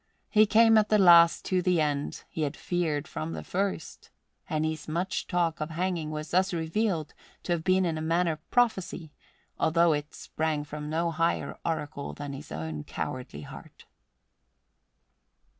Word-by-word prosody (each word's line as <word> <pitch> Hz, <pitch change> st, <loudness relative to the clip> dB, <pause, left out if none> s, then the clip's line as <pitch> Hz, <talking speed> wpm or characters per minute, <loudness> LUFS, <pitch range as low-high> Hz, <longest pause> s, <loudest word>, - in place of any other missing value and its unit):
He 215 Hz, -1 st, +5 dB
came 225 Hz, +1 st, +6 dB
at 210 Hz, -, 0 dB
the 215 Hz, -, +5 dB
last 170 Hz, -3 st, +7 dB
to 185 Hz, -1 st, +1 dB
the 180 Hz, -1 st, +2 dB
end 145 Hz, -2 st, -1 dB
he 160 Hz, -, -5 dB
had 150 Hz, -1 st, -2 dB
feared 160 Hz, -5 st, -1 dB
from 80 Hz, +1 st, -5 dB
the 80 Hz, -1 st, -6 dB
first; 190 Hz, -, -3 dB, 0.4 s
and 155 Hz, 0 st, 0 dB
his 155 Hz, -1 st, -4 dB
much 175 Hz, +4 st, -2 dB
talk 170 Hz, -3 st, 0 dB
of 155 Hz, -, -2 dB
hanging 170 Hz, -1 st, -2 dB
was 155 Hz, 0 st, -5 dB
thus 185 Hz, +1 st, +2 dB
revealed 165 Hz, 0 st, -1 dB, 0.3 s
to -, -, -4 dB
have 170 Hz, -2 st, 0 dB
been 185 Hz, +1 st, +3 dB
in 160 Hz, -2 st, -1 dB
a -, -, -4 dB
manner 165 Hz, 0 st, +1 dB
prophecy, 190 Hz, -9 st, 0 dB, 0.5 s
although 165 Hz, 0 st, +4 dB
it 150 Hz, +1 st, -4 dB
sprang 155 Hz, -2 st, -2 dB
from 150 Hz, 0 st, -7 dB
no 165 Hz, +2 st, 0 dB
higher 165 Hz, +1 st, 0 dB
oracle 150 Hz, -3 st, -3 dB
than 145 Hz, -1 st, -6 dB
his 135 Hz, +2 st, -9 dB
own 80 Hz, -1 st, -5 dB
cowardly 125 Hz, -, -5 dB
heart. 70 Hz, -, -12 dB
160 Hz, 160 wpm, -28 LUFS, 150-180 Hz, 0.5 s, last